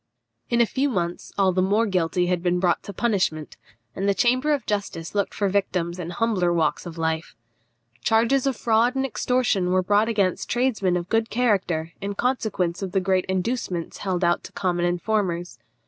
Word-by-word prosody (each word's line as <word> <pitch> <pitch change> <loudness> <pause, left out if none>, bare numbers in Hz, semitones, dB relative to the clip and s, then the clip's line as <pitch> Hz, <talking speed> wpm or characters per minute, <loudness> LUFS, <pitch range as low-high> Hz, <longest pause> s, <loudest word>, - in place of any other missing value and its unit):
In 235 0 +3
a - - +6
few 275 +5 0
months 175 -7 -3
all 195 -2 +4
the 185 +1 +1
more 205 +5 +2
guilty 180 -3 +1
had 180 -1 0
been 180 0 +1
brought 175 -1 +1
to - - -8
punishment, 185 -8 -1 0.4
and 195 +2 0
the 200 - +2
Chamber 255 +9 +2
of 285 -3 0
Justice 200 -6 -3
looked 200 -1 0
for 200 - +1
victims 185 -3 -1
in 170 -1 -4
humbler 180 -2 +1
walks 165 0 0
of 170 -1 -8
life. 160 -2 -2 0.7
Charges 235 +5 +3
of 270 - 0
fraud 235 +3 +2
and 270 0 0
extortion 240 -5 0
were 185 0 +2
brought 205 +4 +3
against 200 -5 0
tradesmen 220 -8 +1
of 175 0 -4
good 225 0 +1
character 185 -9 0
in 200 0 -3
consequence 200 -8 -1
of 190 -2 -4
the 195 - +3
great 185 0 +1
inducements 190 -2 -2
held 185 -2 -1
out 175 0 +2
to - - -10
common 175 -2 0
informers. 175 -1 -1
190 Hz, 185 wpm, -24 LUFS, 175-225 Hz, 0.7 s, a